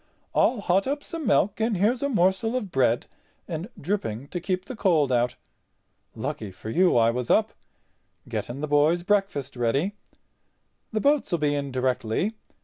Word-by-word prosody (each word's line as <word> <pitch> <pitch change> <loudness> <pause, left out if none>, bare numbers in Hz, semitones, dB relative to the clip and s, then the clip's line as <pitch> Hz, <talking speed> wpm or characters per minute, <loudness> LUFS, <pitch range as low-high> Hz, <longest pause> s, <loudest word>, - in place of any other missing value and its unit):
I'll 235 -4 +3
hot 195 +2 +2
up 285 +1 -2
some 330 -3 -5
milk 200 +3 +2
and 220 -2 +1
here's 225 +7 +2
a 280 - 0
morsel 195 +1 +2
of 210 -7 -3
bread 125 -4 +2 0.4
and 170 +4 -5
dripping 140 - -3
to 175 - -3
keep 185 +1 -2
the 260 - -7
cold 165 - +2
out. 120 0 +1 0.8
Lucky 105 - -4
for 95 +4 -8
you 180 0 +4
I 115 0 +5
was 125 0 -3
up—getting 125 +4 -3
the 150 - -2
boys' 150 +4 +3
breakfast 195 -10 0
ready. 135 - 0 1.0
The 215 -1 -1
boats'll 280 -11 +2
be 150 -2 +1
in 140 -1 -2
directly. 130 - 0
175 Hz, 155 wpm, -26 LUFS, 130-205 Hz, 1.0 s, I